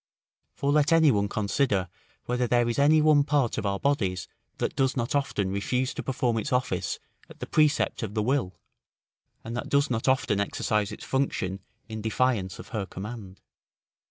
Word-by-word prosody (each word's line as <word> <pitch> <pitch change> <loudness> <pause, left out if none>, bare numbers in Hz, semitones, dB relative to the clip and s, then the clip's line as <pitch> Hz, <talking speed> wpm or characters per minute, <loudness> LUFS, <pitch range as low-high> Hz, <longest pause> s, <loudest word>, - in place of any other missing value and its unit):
For 140 - 0
let 150 0 +3
any 160 -3 +6
one 100 -3 +1
consider, 105 -2 0 0.4
whether 125 0 0
there 120 0 +2
is 120 +3 -1
any 150 +2 +5
one 150 -2 +5
part 140 -4 +1
of - - -2
our 100 0 0
bodies 95 -11 0 0.3
that - - -2
does 135 0 +1
not 120 -1 -1
often 135 -9 0
refuse 125 +6 -1
to - - -4
perform 125 -3 0
its 140 - -4
office 125 0 0 0.3
at - - -14
the - - -4
precept 155 -1 +2
of 110 -2 -5
the 105 - +1
will, 125 -7 0 0.9
and 115 +1 -6
that 125 - -4
does 140 -1 +2
not 115 +1 -1
often 130 -6 +2
exercise 105 +1 0
its 105 - -8
function 100 -8 -1 0.3
in 110 -1 -6
defiance 110 -4 0
of - - -11
her 105 -5 -3
command. 100 -1 -8
120 Hz, 180 wpm, -27 LUFS, 100-140 Hz, 0.9 s, any